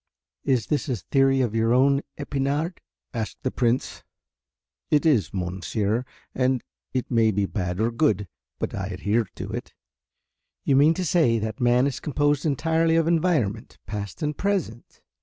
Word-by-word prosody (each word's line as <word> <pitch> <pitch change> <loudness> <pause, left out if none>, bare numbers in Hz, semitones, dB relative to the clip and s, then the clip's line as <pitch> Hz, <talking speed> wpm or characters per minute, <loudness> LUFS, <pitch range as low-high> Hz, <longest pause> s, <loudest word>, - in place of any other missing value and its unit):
"Is 125 -5 +2
this 150 0 -1
a 125 - +1
theory 135 +4 +2
of 120 -4 0
your 115 +1 +2
own, 140 +2 +4 0.2
Epinard?" 145 +4 -2 0.3
asked 115 -3 -4
the 130 - 0
Prince. 120 0 0 0.9
"It 150 +1 +3
is, 140 -11 +3
monsieur, 100 +5 -2 0.3
and 130 -1 +1 0.3
it 130 0 -3
may 115 -2 +4
be 100 -1 +1
bad 90 -2 -3
or 115 +2 +1
good 110 -6 +1 0.3
but - - -3
I 95 -2 -3
adhere 105 +4 0
to - - -6
it." - - -6 0.9
"You 135 - +2
mean 150 +4 +5
to 185 - -2
say 150 -9 +3
that 110 0 -4
man 120 +1 +4
is 135 -2 -2
composed 145 +1 +1
entirely 160 +3 +2
of 165 -1 +3
environment, 155 - 0
past 100 - -5
and 150 0 -1
present?" 185 - -3
125 Hz, 160 wpm, -25 LUFS, 110-145 Hz, 0.9 s, mean